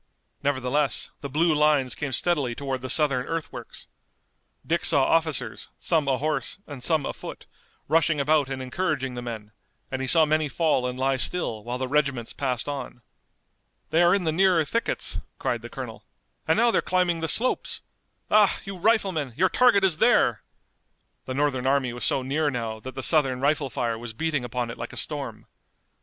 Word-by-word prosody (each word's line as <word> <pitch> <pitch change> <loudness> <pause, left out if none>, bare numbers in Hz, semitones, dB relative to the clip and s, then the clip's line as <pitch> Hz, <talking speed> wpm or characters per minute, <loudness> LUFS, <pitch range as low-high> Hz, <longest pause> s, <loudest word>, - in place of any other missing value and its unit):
Nevertheless 140 +1 0
the 140 - -6
blue 160 +4 +2
lines 150 -4 +3
came 145 -2 -4
steadily 140 -4 +1
toward 135 -2 -4
the 130 - -5
Southern 140 -5 +3
earthworks. 165 -1 -5 0.8
Dick 170 +1 0
saw 145 -5 +5
officers, 160 -2 0
some 155 -4 +1
ahorse, 140 +4 -1
and 145 -4 -9
some 155 +1 +1
afoot, - - -7 0.4
rushing 160 -1 +2
about 145 -1 +2
and 130 -1 -4
encouraging 130 -2 -2
the 120 - -5
men, 110 -3 -7 0.4
and 130 0 -3
he 130 - -2
saw 160 +3 +6
many 155 0 +1
fall 150 -5 +1
and 125 0 -5
lie 135 +1 +1
still 120 -7 0
while 120 +2 -4
the 130 0 -3
regiments 140 -4 0
passed 130 -3 -2
on. 135 -4 -6 0.9
"They 165 - +4
are 175 +2 +5
in 200 - -1
the 160 - +1
nearer 180 -1 +3
thickets," 230 +10 -1 0.2
cried - - -2
the - - -9
colonel, - - -8 0.4
"and - - +3
now 235 +1 +4
they're - - +2
climbing 180 -2 +1
the 165 - -1
slopes! 245 +10 0 0.5
Ah, 210 -2 +5
you 195 -1 -6
riflemen, 190 - +1
your 185 - +3
target 245 -6 +4
is 180 -5 +2
there!" - - +3 0.8
The 130 - -4
Northern 135 -3 0
army 135 -3 +1
was 120 - -3
so 135 - +1
near 145 +3 0
now 115 -4 -4
that 130 +4 -9
the 130 - -4
Southern 135 -6 +3
rifle 145 0 +1
fire 115 -2 -2
was 120 -1 -7
beating 150 +1 -1
upon 120 0 -3
it - - -10
like - - -6
a - - -7
storm. - - -5
145 Hz, 180 wpm, -25 LUFS, 130-165 Hz, 0.9 s, saw